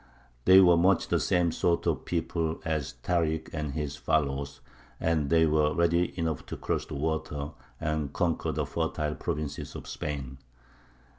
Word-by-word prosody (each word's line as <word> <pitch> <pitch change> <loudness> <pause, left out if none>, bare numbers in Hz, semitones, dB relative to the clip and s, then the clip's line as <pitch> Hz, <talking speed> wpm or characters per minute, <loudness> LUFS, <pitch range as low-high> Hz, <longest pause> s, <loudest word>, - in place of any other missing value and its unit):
They 95 +1 +9
were 90 -3 +7
much 90 +2 +3
the - - +2
same 90 -2 +2
sort 85 +1 +1
of - - 0
people 80 -1 -1
as 75 -5 -2
Tārik 80 -3 0
and 75 -3 -3
his 75 -2 -3
followers, 70 -2 -1 0.4
and 80 -4 +1
they 80 0 +5
were 75 -1 +2
ready 85 +1 +2
enough 80 -4 -1
to - - -5
cross - - -2
the - - -6
water 75 -1 -2 0.3
and 75 -2 -1
conquer 85 +1 0
the - - -1
fertile 75 0 -2
provinces 75 -2 -4
of - - -8
Spain. 70 -3 -5
80 Hz, 155 wpm, -28 LUFS, 75-85 Hz, 0.4 s, They